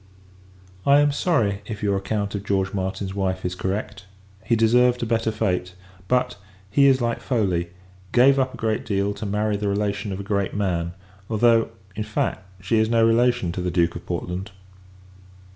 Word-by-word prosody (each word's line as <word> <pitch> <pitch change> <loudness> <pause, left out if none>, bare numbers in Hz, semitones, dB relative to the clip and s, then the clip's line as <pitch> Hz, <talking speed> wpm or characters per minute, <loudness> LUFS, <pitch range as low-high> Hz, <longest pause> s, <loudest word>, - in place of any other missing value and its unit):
I 140 +1 +5
am 145 0 +4
sorry, 115 - +1
if 110 -2 -6
your 100 -1 +2
account 100 +1 -2
of 100 -1 -4
George 95 -1 0
Martin's 95 0 -3
wife 95 -2 -2
is 90 - -1
correct; 95 +1 -4 0.4
he 115 - +2
deserved 120 +2 +3
a - - 0
better 115 0 0
fate. 90 -3 -1 0.3
But, 125 -1 +1 0.3
he 140 +6 +5
is 130 -1 +4
like 120 -1 -1
Foley; 95 -9 0 0.4
gave 135 +3 +5
up 130 -1 0
a - - -10
great 110 -1 -1
deal, 100 -1 0
to 105 - -6
marry 105 +1 0
the 105 0 -2
relation 100 0 -1
of 95 - -4
a - - -4
great 100 -1 -1
man: 85 -4 -1 0.4
although, 115 +1 +3 0.3
in 110 - -3
fact, 105 -2 -2 0.2
she 110 +4 +2
is 110 0 +2
no 115 -1 +4
relation 120 -4 +2
to 90 - -4
the 90 - -1
Duke 85 -1 +1
of 85 - -7
Portland. 90 +3 -4
105 Hz, 180 wpm, -23 LUFS, 95-115 Hz, 0.4 s, I